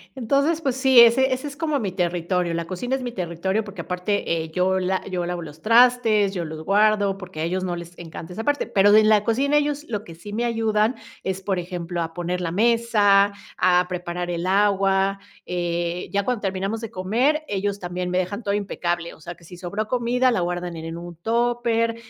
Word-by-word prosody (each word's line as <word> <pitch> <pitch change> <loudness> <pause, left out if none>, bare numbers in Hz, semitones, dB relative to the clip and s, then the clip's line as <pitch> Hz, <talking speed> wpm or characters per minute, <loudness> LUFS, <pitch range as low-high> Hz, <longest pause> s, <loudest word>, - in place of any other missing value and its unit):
Entonces, 280 +6 +1
pues 265 -4 -1
sí, 260 -2 +7
ese 260 +3 +5
ese 260 +3 -4
es 285 0 -9
como 310 -3 0
mi 200 -4 -2
territorio, 175 0 -1
la 170 0 -2
cocina 190 +10 -3
es 265 - -4
mi 245 -1 -4
territorio, 190 +1 -2
porque 200 -4 -7
aparte 180 -1 -1
eh, 160 - -9
yo 185 +2 +1
la 185 0 -1
yo 180 -1 -1
lavo 175 0 -3
los 155 -1 -10
trastes, 230 -2 +4
yo 175 -3 -3
los 155 0 -7
guardo 205 0 +3
porque 185 -5 -8
a - - 0
ellos 185 +3 -1
no 175 -1 -2
les 170 0 -9
encanta 165 0 -9
esa 220 +5 -5
parte, 290 0 0
pero 205 +1 +4
de 215 - +8
en 215 - +3
la 210 -1 +4
cocina 275 +6 +2
ellos 295 0 0
lo 210 -2 -3
que 165 - -11
sí 205 +5 -10
me 230 +3 -1
ayudan 225 0 +1 0.3
es, 190 0 -3
por 190 -1 -1
ejemplo, 175 -1 -4
a 165 0 -4
poner 175 +1 -3
la 170 -2 -2
mesa, 205 -1 +3 0.2
a 180 0 +4
preparar 175 -1 -4
el 170 0 -2
agua, 195 0 +2 0.3
eh, 175 0 -2
ya 200 0 +1
cuando 245 0 -1
terminamos 195 +2 -2
de 225 -1 -6
comer, 245 +12 +1
ellos 200 0 -2
también 180 0 -4
me 180 - 0
dejan 185 +5 -2
todo 200 - -1
impecable, 175 -4 -2
o - - -17
sea 170 +3 -8
que - - -22
si 175 +2 -12
sobró 200 +5 -4
comida, 250 +1 +2
la 230 - +1
guardan 175 0 -3
en 160 - -7
en 165 0 -6
un 175 0 -8
tupper 230 +2 0
195 Hz, 215 wpm, -23 LUFS, 175-230 Hz, 0.3 s, de